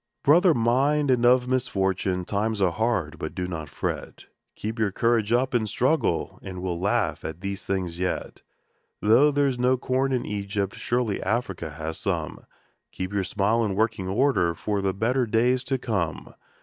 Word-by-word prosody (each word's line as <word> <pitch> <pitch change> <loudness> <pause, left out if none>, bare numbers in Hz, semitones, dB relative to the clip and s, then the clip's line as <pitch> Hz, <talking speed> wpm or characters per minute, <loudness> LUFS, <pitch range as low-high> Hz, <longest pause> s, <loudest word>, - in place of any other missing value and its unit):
Brother 170 +3 +5
mine, 135 +5 +2
and 125 -2 +2
of 125 0 +4
misfortune! 95 -7 0
times 105 +2 -1
are 95 -3 +3
hard, 95 -7 -1
but 80 - -5
do 90 -1 -2
not 80 -4 -5
fret, - - -5 0.3
Keep 110 +2 -5
your 105 -2 +1
courage 115 +1 +1
up 125 +2 +2
and 110 -3 +1
struggle, 130 - 0
and 90 -1 -7
we'll 90 -2 -2
laugh 100 +3 0
at 80 +2 -6
these 100 0 -4
things 90 -3 -2
yet. 90 0 -3 0.6
Though 120 +8 +5
there 145 0 +2
is 130 -3 -1
no 125 +1 +3
corn 130 +2 0
in 125 -2 0
Egypt, 100 -1 -2
surely 120 -4 -1
Africa 95 -6 -2
has 80 +1 -6
some - - -3 0.4
Keep 95 +2 -5
your 100 -1 +1
smile 105 +5 +1
in 100 -3 -1
working 110 -3 0
order 95 -6 +2
for 100 +3 -2
the 95 -1 -1
better 120 +4 +1
days 125 +3 +2
to 135 -1 0
come 100 -10 -3
110 Hz, 175 wpm, -25 LUFS, 95-125 Hz, 0.6 s, Brother